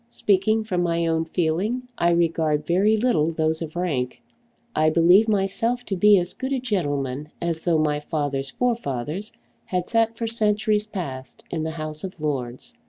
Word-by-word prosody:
Speaking 215 +1 +2
from 185 -5 -1
my 170 -1 +1
own 165 0 +1
feeling 180 +9 -1
I 170 - +2
regard 160 -3 +1
very 200 +5 +3
little 170 -9 +2
those 160 0 0
of 160 -1 -6
rank. 140 -9 -2 0.6
I 155 0 +4
believe 175 +7 +5
myself 220 +4 0
to 195 - -2
be 205 +2 +6
as 180 0 -1
good 260 +1 -5
a 265 - 0
gentleman 145 - -2
as 170 -2 -2
though 170 -2 +2
my 150 -1 +1
father's 145 -3 -2
forefathers 195 - -2 0.3
had 180 -1 -2
sat 225 -1 +1
for 230 - -2
centuries 215 -1 +1
past 135 -11 -6
in 165 - -2
the 160 - -2
House 155 -1 -6
of 185 -2 -7
Lords. 140 - -4
170 Hz, 170 wpm, -24 LUFS, 155-210 Hz, 0.6 s, be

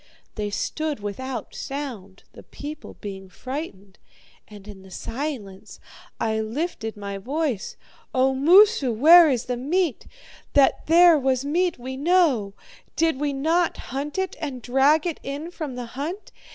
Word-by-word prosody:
They 210 -1 -3
stood 305 +7 -3
without 235 +6 -5
sound, 240 -9 -7
the - - -12
people 300 +1 -9
being 195 -2 -7
frightened, 205 - -7 0.5
and 205 -1 -13
in 200 -2 -10
the 190 - -15
silence 225 - -6 0.4
I 220 -1 0
lifted 225 -1 -4
my 200 -1 -5
voice. 265 -1 -2 0.4
"O 265 +1 +2
Moosu, 320 - +5
where 320 +8 +8
is 250 -4 0
the 250 -1 -2
meat? 315 +3 -1 0.5
That 280 -2 +3
there 335 -1 +7
was 265 0 0
meat 345 +4 0
we 260 +2 -6
know. 285 - +2 0.4
Did 320 -4 +1
we 295 0 0
not 325 +5 +1 0.2
hunt 285 +4 -4
it 380 -1 -2
and 260 -6 -5
drag 275 +6 +3
it 340 -3 -3
in 290 +5 -6
from 305 -7 -6
the 250 -1 -5
hunt? 320 +10 -5
270 Hz, 145 wpm, -24 LUFS, 220-315 Hz, 0.5 s, where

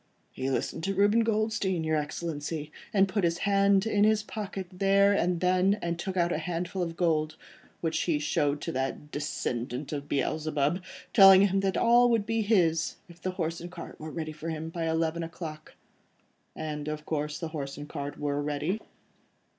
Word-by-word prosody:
"He 130 +1 -3
listened 160 +4 -2
to 195 0 -1
Reuben 205 +4 +4
Goldstein, 215 -5 0
your 160 0 +1
Excellency, 150 0 -3 0.2
and 195 -1 +4
put 190 +1 -1
his 170 0 +2
hand 200 +1 +3
in 205 -2 +2
his 215 0 +3
pocket 200 -3 -5
then 200 +1 +4
and 180 -2 +1
there, 185 +3 +3
and 170 0 -3
took 190 +1 -3
out 175 0 +2
a 155 - 0
handful 175 +3 -3
of 165 -1 -3
gold, 155 -3 +1 0.5
which 165 -1 0
he 165 -4 +1
showed 150 -1 0
to 165 - -3
that 135 +2 -3
descendant 130 -1 -3
of 145 0 -5
Beelzebub, 150 +3 0 0.3
telling 195 -1 +9
him 195 0 +1
that 195 -1 0
all 240 +1 +5
that - - +2
would 220 -3 +1
be 225 +1 0
his, 175 -7 +2
if 170 -1 -16
the 185 - -2
horse 165 -2 -3
and 175 0 -7
cart - - -9
were 155 - -6
ready 155 0 -4
for 155 +2 -6
him 160 0 -4
by 165 -1 -2
eleven 160 +1 0
o'clock." 160 -2 -7 0.8
"And, 150 -1 -4
of 150 0 -4
course, 150 -1 -2
the 165 - -4
horse 140 -4 -5
and 145 0 -7
cart 145 -1 -5
were 145 0 -1
ready?" 150 +8 -2
165 Hz, 185 wpm, -28 LUFS, 150-195 Hz, 0.8 s, telling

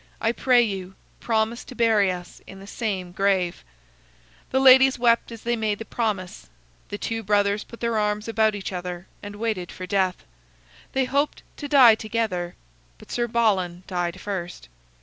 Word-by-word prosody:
I 225 - +1
pray 245 0 +4
you, 190 -3 -4 0.2
promise 225 +1 -1
to 255 - -11
bury 220 -5 +3
us 180 -1 -8
in 195 - -11
the 195 - -11
same 195 -4 -4
grave." 190 -2 0 0.9
The 265 - +1
ladies 265 0 +7
wept 235 -1 +2
as 230 -1 -10
they 240 0 0
made 215 -2 -1
the 225 - -7
promise. 200 - -3 0.4
The 205 - -4
two 225 +2 -3
brothers 205 0 +1
put 235 - -14
their 235 -2 0
arms 210 +1 -1
about 220 -1 +2
each 200 -1 -5
other 180 0 -5 0.2
and 205 0 -8
waited 210 -5 -3
for 185 - -7
death. 185 -1 0 0.7
They 265 -1 +1
hoped 280 +3 -1
to 290 - -5
die 265 -5 +7
together, 215 -6 -2 0.4
but - - -15
Sir 240 0 0
Balan 190 -7 0
died 175 -1 -3
first. 180 - -6
210 Hz, 170 wpm, -24 LUFS, 185-235 Hz, 0.9 s, ladies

